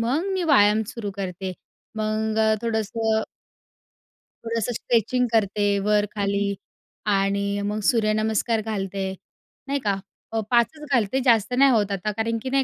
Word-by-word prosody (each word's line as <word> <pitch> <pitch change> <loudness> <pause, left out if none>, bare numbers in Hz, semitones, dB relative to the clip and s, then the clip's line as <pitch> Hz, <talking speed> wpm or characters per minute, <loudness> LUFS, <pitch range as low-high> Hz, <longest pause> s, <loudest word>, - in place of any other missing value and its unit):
मग 295 +12 0
मी 375 -1 -1
व्यायाम 210 -3 +5
सुरू 215 -4 -4
करते. 185 -1 -4 0.4
मग 215 0 -1 0.2
थोडंसं 220 -1 0 1.2
थोडंसं 230 0 -2
स्ट्रेचिंग 245 +2 +1
करते 205 -1 +2 0.2
वरखाली 205 -1 +1 0.6
आणि 200 +1 0
मग 205 +1 -2
सूर्यनमस्कार 220 0 +1
घालते, 195 -3 -3 0.5
नाही 280 +1 0
का? 205 -6 0 0.4
प 225 - 0
5 235 -1 +5
च 300 - -9
घालते 240 +1 +2
जास्त 230 -1 +3
नाही 275 0 +6
होत 210 -4 +2
आता 200 +2 -2
कारण 230 +1 0
की 260 - -3
नाही 270 0 +2
215 Hz, 135 wpm, -24 LUFS, 200-235 Hz, 1.2 s, नाही